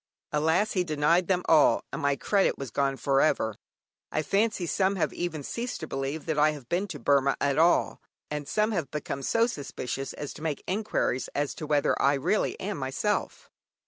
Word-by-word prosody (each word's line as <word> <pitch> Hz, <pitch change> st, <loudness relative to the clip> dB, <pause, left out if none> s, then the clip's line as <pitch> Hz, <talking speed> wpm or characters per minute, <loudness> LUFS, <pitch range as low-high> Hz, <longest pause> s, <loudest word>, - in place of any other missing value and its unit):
Alas! 160 Hz, +8 st, +2 dB
he 185 Hz, -, +1 dB
denied 165 Hz, +2 st, +2 dB
them 180 Hz, -2 st, +1 dB
all, 155 Hz, -3 st, +5 dB
and -, -, -3 dB
my 140 Hz, 0 st, +2 dB
credit 195 Hz, +7 st, +1 dB
was 135 Hz, -3 st, -6 dB
gone 135 Hz, -1 st, 0 dB
for 135 Hz, -1 st, +2 dB
ever. 110 Hz, -8 st, +1 dB, 0.6 s
I 155 Hz, -, 0 dB
fancy 200 Hz, +2 st, +1 dB
some 190 Hz, +3 st, +1 dB
have 180 Hz, -, 0 dB
even 160 Hz, -4 st, -3 dB
ceased 235 Hz, -, -4 dB
to 160 Hz, -, -5 dB
believe 135 Hz, +3 st, -3 dB
that 155 Hz, -2 st, -1 dB
I 155 Hz, +1 st, +4 dB
have 140 Hz, -5 st, -10 dB
been 180 Hz, +7 st, 0 dB
to 175 Hz, -6 st, -6 dB
Burmah 140 Hz, -1 st, +3 dB
at 140 Hz, +1 st, +1 dB
all, 170 Hz, +2 st, +3 dB, 0.3 s
and 150 Hz, -1 st, -4 dB
some 215 Hz, +1 st, +1 dB
have 175 Hz, -9 st, -2 dB
become 145 Hz, -2 st, -4 dB
so 230 Hz, -, +2 dB
suspicious 135 Hz, -, -4 dB
as 145 Hz, -, -6 dB
to -, -, -12 dB
make 155 Hz, -3 st, -3 dB
enquiries 195 Hz, -, -1 dB
as 145 Hz, 0 st, 0 dB
to 155 Hz, -, -7 dB
whether 145 Hz, -1 st, +2 dB
I 140 Hz, +1 st, +4 dB
really 140 Hz, +10 st, 0 dB
am 195 Hz, -4 st, -4 dB
myself. 135 Hz, +11 st, -2 dB
155 Hz, 195 wpm, -27 LUFS, 140-185 Hz, 0.6 s, all